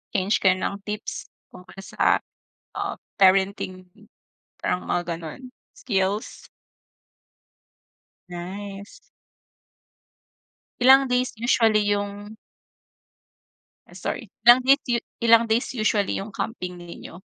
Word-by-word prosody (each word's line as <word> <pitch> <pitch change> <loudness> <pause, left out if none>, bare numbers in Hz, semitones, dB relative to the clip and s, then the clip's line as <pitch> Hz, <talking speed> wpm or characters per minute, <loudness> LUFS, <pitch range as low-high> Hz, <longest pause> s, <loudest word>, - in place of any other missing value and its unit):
Change 195 +2 +2
kayo 185 -1 +4
ng 200 +2 -3
tips 210 +1 -5 0.2
tungkol 185 +1 -14
sa, - - +1 0.5
ah, - - -3 0.2
parenting, 190 -1 +2 0.7
parang 180 - -2
mga 175 -1 -1
gano'n, 165 - -8 0.3
skills. 200 -2 -2 1.8
Nice. 195 - -8 1.8
Ilang 265 +1 +6
days 250 0 0
usually 220 -4 +3
'yung 205 +1 -5 1.5
Ay - - -17
sorry. - - -4 0.2
Ilang 240 +2 +8
days 275 +2 +5
u 235 - +2 0.2
ilang 230 0 +6
days 225 +2 +1
usually 210 -2 +1
yung 200 +2 -7
camping 180 -6 -4
ninyo. 175 0 -11
200 Hz, 95 wpm, -24 LUFS, 185-225 Hz, 1.8 s, Ilang